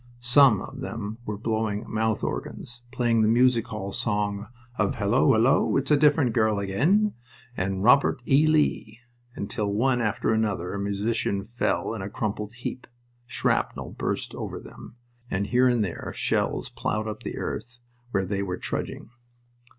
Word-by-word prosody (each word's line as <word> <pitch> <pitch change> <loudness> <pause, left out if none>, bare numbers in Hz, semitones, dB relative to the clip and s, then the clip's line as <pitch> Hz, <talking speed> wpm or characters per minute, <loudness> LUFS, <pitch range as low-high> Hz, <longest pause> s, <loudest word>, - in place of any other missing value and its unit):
Some 120 -4 +5
of 135 - -9
them 115 -3 -5
were 105 -1 -3
blowing 110 0 -1
mouth 110 0 -1
organs, 120 0 -5
playing 120 -3 +2
the 110 - +4
music 120 0 +3
hall 100 -2 -5
song 105 -1 -1 0.3
of 105 -2 +1
"Hullo, 105 +6 +2
hullo, 115 +5 +3
it's 135 +2 -1
a - - +7
different 145 -4 +3
girl 110 -2 +2
again!" 155 - +2 0.4
and 95 -1 -1
the - - -4
"Robert 125 +6 +5
E. 145 +3 +5
Lee," 145 -7 +1 0.3
until 100 +1 -3
one 125 +4 +2
after 110 0 0
another 105 -5 -1
a 100 - -3
musician 100 0 -1
fell 115 0 -1
in 110 - -5
a 95 - -4
crumpled 105 0 -3
heap. 125 +1 -6 0.4
Shrapnel - - -1
burst - - -3
over - - -5
them, - - -12 0.3
and 100 +1 -1
here 125 +4 +3
and 120 -4 +2
there 90 - -5
shells - - 0
plowed 110 0 -2
up 110 0 -5
the - - -5
earth 120 +1 -5 0.3
where 95 -5 0
they 100 +1 -2
were 90 -2 -3
trudging. - - -5
110 Hz, 160 wpm, -26 LUFS, 100-125 Hz, 0.4 s, a